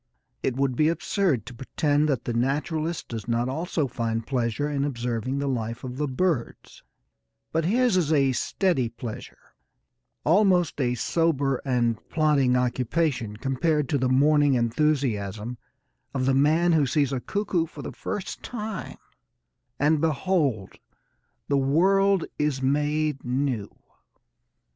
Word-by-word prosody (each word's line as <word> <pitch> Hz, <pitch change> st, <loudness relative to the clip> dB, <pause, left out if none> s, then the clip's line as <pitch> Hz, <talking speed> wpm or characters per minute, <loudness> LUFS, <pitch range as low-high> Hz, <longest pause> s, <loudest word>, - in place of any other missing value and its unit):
It 130 Hz, -, -1 dB
would 135 Hz, -1 st, 0 dB
be 155 Hz, +4 st, +3 dB
absurd 170 Hz, -, 0 dB
to -, -, -9 dB
pretend 145 Hz, +4 st, 0 dB
that 130 Hz, -5 st, -1 dB
the 120 Hz, -, -2 dB
naturalist 150 Hz, +6 st, -1 dB
does 115 Hz, -2 st, -6 dB
not 120 Hz, +1 st, 0 dB
also 160 Hz, +3 st, -1 dB
find 115 Hz, -2 st, -2 dB
pleasure 125 Hz, +1 st, -1 dB
in 145 Hz, -2 st, -1 dB
observing 125 Hz, -1 st, -2 dB
the 140 Hz, 0 st, -1 dB
life 115 Hz, -2 st, -3 dB
of 125 Hz, -1 st, -6 dB
the 150 Hz, +1 st, -1 dB
birds, 140 Hz, -1 st, -2 dB, 0.7 s
but 165 Hz, 0 st, 0 dB
his 240 Hz, +3 st, +2 dB
is 160 Hz, -4 st, +1 dB
a 140 Hz, -3 st, +3 dB
steady 135 Hz, -, 0 dB
pleasure, 115 Hz, -1 st, -9 dB, 0.7 s
almost 180 Hz, -3 st, +3 dB
a 125 Hz, -1 st, +1 dB
sober 140 Hz, -1 st, 0 dB
and 120 Hz, -4 st, +1 dB
plodding 145 Hz, -5 st, +2 dB
occupation, 125 Hz, -2 st, 0 dB
compared 140 Hz, +4 st, 0 dB
to 145 Hz, -, +1 dB
the 130 Hz, 0 st, +1 dB
morning 145 Hz, +1 st, +4 dB
enthusiasm 120 Hz, -4 st, 0 dB, 0.6 s
of 130 Hz, -1 st, 0 dB
the 135 Hz, -, +3 dB
man 155 Hz, +6 st, +3 dB
who 155 Hz, -4 st, +3 dB
sees 140 Hz, 0 st, +1 dB
a 130 Hz, -, -1 dB
cuckoo 185 Hz, -, -1 dB
for -, -, -10 dB
the -, -, -5 dB
first 200 Hz, -1 st, -5 dB
time, 220 Hz, -4 st, -6 dB, 0.8 s
and, 150 Hz, +1 st, +2 dB
behold, 150 Hz, -, 0 dB, 0.7 s
the 140 Hz, -1 st, +2 dB
world 190 Hz, +7 st, +3 dB
is 150 Hz, -3 st, 0 dB
made 150 Hz, +2 st, 0 dB
new. 125 Hz, -4 st, -1 dB
140 Hz, 135 wpm, -25 LUFS, 125-160 Hz, 0.8 s, morning